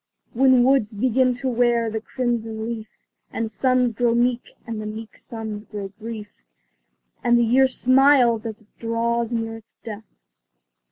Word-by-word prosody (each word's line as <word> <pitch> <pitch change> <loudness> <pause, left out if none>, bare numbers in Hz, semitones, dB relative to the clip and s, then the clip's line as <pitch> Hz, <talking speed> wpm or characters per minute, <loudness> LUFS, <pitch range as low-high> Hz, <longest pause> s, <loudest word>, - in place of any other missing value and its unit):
When 260 0 +5
woods 245 -5 +2
begin 255 +3 +2
to 260 +2 -4
wear 235 -2 +2
the 220 0 -3
crimson 225 -3 -3
leaf, 225 -2 -5 0.4
And 225 -1 -3
suns 255 0 +2
grow 235 +1 +1
meek, 245 +1 +1 0.2
and 225 -3 -5
the 215 - -5
meek 220 +1 -8
suns 220 -2 -7
grow 205 -2 -7
brief 215 +1 -8 0.9
And 240 0 +4
the 240 - +4
year 260 +4 +4
smiles 255 -3 +4
as 220 0 -7
it 210 - -36
draws 230 0 -1
near 225 -1 -2
its 225 0 -19
death. 215 -2 -8
230 Hz, 155 wpm, -23 LUFS, 220-245 Hz, 0.9 s, When